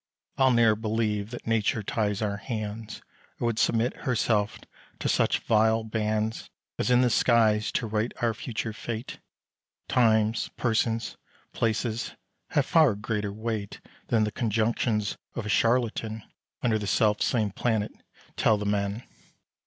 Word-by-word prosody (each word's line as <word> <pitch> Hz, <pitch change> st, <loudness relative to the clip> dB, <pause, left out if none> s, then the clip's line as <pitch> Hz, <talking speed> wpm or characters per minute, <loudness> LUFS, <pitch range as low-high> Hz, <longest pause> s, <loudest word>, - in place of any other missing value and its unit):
I'll 135 Hz, -1 st, +4 dB
ne'er 115 Hz, -3 st, +4 dB
believe 105 Hz, -1 st, -1 dB
that 120 Hz, -, -8 dB
Nature 110 Hz, -1 st, +1 dB
ties 105 Hz, 0 st, -1 dB
our 100 Hz, -1 st, -1 dB
hands, 110 Hz, -1 st, -5 dB, 0.4 s
Or -, -, -1 dB
would 115 Hz, -2 st, 0 dB
submit 115 Hz, +2 st, +1 dB
herself 110 Hz, -4 st, 0 dB, 0.4 s
to -, -, -3 dB
such -, -, +2 dB
vile 110 Hz, 0 st, +3 dB
bands, 110 Hz, 0 st, -2 dB, 0.3 s
As -, -, 0 dB
in 125 Hz, 0 st, +5 dB
the 125 Hz, -, +3 dB
skies 110 Hz, -3 st, +3 dB
to 115 Hz, -, 0 dB
write 110 Hz, +1 st, -1 dB
our 120 Hz, -2 st, +1 dB
future 110 Hz, +1 st, -4 dB
fate; 115 Hz, +1 st, -6 dB, 0.7 s
Times, 110 Hz, -2 st, +2 dB
persons, 115 Hz, -1 st, 0 dB, 0.4 s
places, 115 Hz, +1 st, -1 dB, 0.3 s
have 145 Hz, -, +2 dB
far 155 Hz, -, +4 dB
greater 105 Hz, 0 st, -2 dB
weight 110 Hz, -1 st, -4 dB, 0.3 s
Than 110 Hz, -2 st, +2 dB
the 105 Hz, -, -1 dB
conjunctions 110 Hz, -1 st, 0 dB, 0.2 s
of 120 Hz, -, -4 dB
a -, -, -4 dB
charlatan, 115 Hz, -2 st, +1 dB, 0.4 s
Under 110 Hz, -3 st, +2 dB
the 105 Hz, -, -4 dB
self 105 Hz, 0 st, +2 dB
same 110 Hz, -4 st, +1 dB
planet, 110 Hz, 0 st, -1 dB, 0.4 s
tell 110 Hz, -, +3 dB
the 105 Hz, -, -4 dB
man. 100 Hz, +2 st, -1 dB
110 Hz, 140 wpm, -27 LUFS, 105-115 Hz, 0.7 s, in